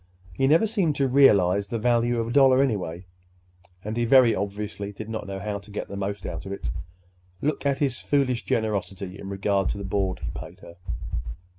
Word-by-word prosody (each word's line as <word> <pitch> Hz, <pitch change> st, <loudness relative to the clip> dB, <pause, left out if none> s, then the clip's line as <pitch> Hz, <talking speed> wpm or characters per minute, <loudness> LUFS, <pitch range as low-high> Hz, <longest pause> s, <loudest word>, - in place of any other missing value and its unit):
He 135 Hz, +10 st, +1 dB
never 160 Hz, +9 st, +5 dB
seemed 195 Hz, -9 st, +1 dB
to 140 Hz, 0 st, +2 dB
realize 100 Hz, -8 st, +4 dB
the 115 Hz, -, -2 dB
value 120 Hz, +1 st, +2 dB
of 115 Hz, 0 st, -2 dB
a -, -, -3 dB
dollar, 135 Hz, 0 st, +6 dB
anyway, 90 Hz, -8 st, -2 dB, 0.8 s
and 105 Hz, +2 st, -4 dB
he 120 Hz, -, +1 dB
very 120 Hz, -1 st, +6 dB
obviously 100 Hz, +1 st, -4 dB
did 105 Hz, +1 st, -8 dB
not 110 Hz, -2 st, -4 dB
know 95 Hz, 0 st, -4 dB
how 100 Hz, +1 st, -3 dB
to 100 Hz, +2 st, -16 dB
get 105 Hz, -, -5 dB
the 100 Hz, -, -6 dB
most 100 Hz, +1 st, -4 dB
out 85 Hz, +2 st, -5 dB
of -, -, -6 dB
it. 75 Hz, -10 st, -4 dB, 0.7 s
Look 145 Hz, -1 st, -1 dB
at 140 Hz, -1 st, +1 dB
his 135 Hz, -4 st, 0 dB
foolish 135 Hz, -4 st, +1 dB
generosity 100 Hz, -3 st, -2 dB
in 95 Hz, -, -7 dB
regard 100 Hz, 0 st, 0 dB
to -, -, -2 dB
the 100 Hz, -, -5 dB
board 95 Hz, -1 st, -1 dB
he -, -, -5 dB
paid -, -, -9 dB
her! 85 Hz, -, -13 dB
105 Hz, 200 wpm, -25 LUFS, 100-130 Hz, 0.8 s, dollar